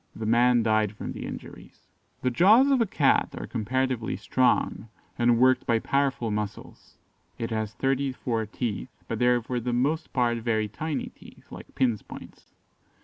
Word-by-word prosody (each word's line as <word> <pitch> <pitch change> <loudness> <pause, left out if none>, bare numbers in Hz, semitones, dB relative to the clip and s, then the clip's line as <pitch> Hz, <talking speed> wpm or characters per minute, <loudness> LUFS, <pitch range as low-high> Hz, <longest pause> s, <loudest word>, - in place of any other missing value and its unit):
The 110 - -5
man 120 +1 +4
died 110 -2 +1
from - - -6
the - - -6
injuries." - - -11 0.4
The 125 - +1
jaws 220 - +5
of 265 -3 +3
a 230 - +2
Cat 145 -6 +2
are - - -5
comparatively 125 +1 -2
strong, 125 -2 0 0.3
and 120 0 +3
worked 130 +1 +3
by 115 - +3
powerful 135 -2 0
muscles; 105 -1 -6 0.4
it 115 0 -4
has 110 -1 -3
thirty 135 0 0
four 115 -4 -3
teeth, 105 - -4 0.2
but - - -3
they 125 - +3
are 125 -1 +3
for 125 +1 -2
the 120 +1 -3
most 140 +7 0
part 120 -2 +1
very 110 -2 0
tiny 155 +8 -4
teeth, - - -17
like - - -11
pin's 120 -5 +1
points. - - -12
120 Hz, 170 wpm, -26 LUFS, 110-130 Hz, 0.4 s, jaws